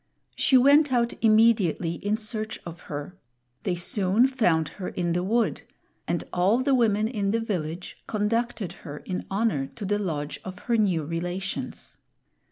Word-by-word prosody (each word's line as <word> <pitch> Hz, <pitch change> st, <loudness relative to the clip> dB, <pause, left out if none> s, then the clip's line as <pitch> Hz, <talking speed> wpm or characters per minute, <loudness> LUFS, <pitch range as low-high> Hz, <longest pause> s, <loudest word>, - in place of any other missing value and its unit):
She 265 Hz, -, +4 dB
went 285 Hz, +3 st, +6 dB
out 235 Hz, -2 st, +2 dB
immediately 215 Hz, -7 st, +4 dB
in 205 Hz, +1 st, +1 dB
search 215 Hz, 0 st, -4 dB
of 170 Hz, 0 st, -8 dB
her; 145 Hz, +5 st, -5 dB, 0.5 s
they 185 Hz, -, -1 dB
soon 190 Hz, +5 st, +2 dB
found 180 Hz, -, +2 dB
her 185 Hz, +3 st, -7 dB
in 175 Hz, -2 st, -1 dB
the 175 Hz, -, +1 dB
wood, 225 Hz, +5 st, +1 dB, 0.5 s
and -, -, -1 dB
all 185 Hz, +6 st, +3 dB
the 265 Hz, +2 st, +1 dB
women 215 Hz, -4 st, +3 dB
in 210 Hz, -4 st, -1 dB
the 225 Hz, +3 st, +1 dB
village 180 Hz, -6 st, -4 dB
conducted 220 Hz, -2 st, -1 dB
her 150 Hz, -3 st, -7 dB
in 185 Hz, +4 st, -5 dB
honor 195 Hz, -9 st, 0 dB
to 210 Hz, -, -5 dB
the 205 Hz, +2 st, 0 dB
lodge 155 Hz, -7 st, -3 dB
of 185 Hz, -1 st, -7 dB
her 235 Hz, -, +2 dB
new 190 Hz, -8 st, +2 dB
relations. 175 Hz, +5 st, -5 dB
200 Hz, 160 wpm, -26 LUFS, 175-230 Hz, 0.5 s, went